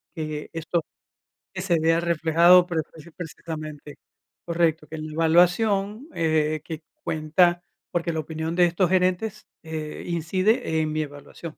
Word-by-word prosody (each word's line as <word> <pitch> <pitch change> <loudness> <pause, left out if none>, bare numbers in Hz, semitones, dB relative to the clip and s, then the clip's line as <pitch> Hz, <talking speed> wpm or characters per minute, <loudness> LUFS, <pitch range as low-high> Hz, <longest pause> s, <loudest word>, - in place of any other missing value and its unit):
que 155 -2 -5
esto 165 0 -1 0.7
que 185 - -4
se 175 -4 +1
vea 165 +1 +3
reflejado 170 +1 +5
prefis 160 -1 -5
precisamente, 155 -3 -7 0.5
correcto, 165 -2 +1
que 160 - -8
en 155 0 -5
la 155 - -8
evaluación, 195 - +2
eh, 155 -2 +1
que 160 -1 -7 0.2
cuenta, 175 +3 +2 0.3
porque 170 -1 -1
la 160 - -2
opinión 160 +2 -4
de 180 -1 +5
estos 175 +1 +1
gerentes, 185 +3 0 0.2
eh, 155 -1 -6
incide 175 - +1
en 155 -1 -1
mi 155 0 -1
evaluación. 145 +2 -12
165 Hz, 140 wpm, -25 LUFS, 155-175 Hz, 0.7 s, reflejado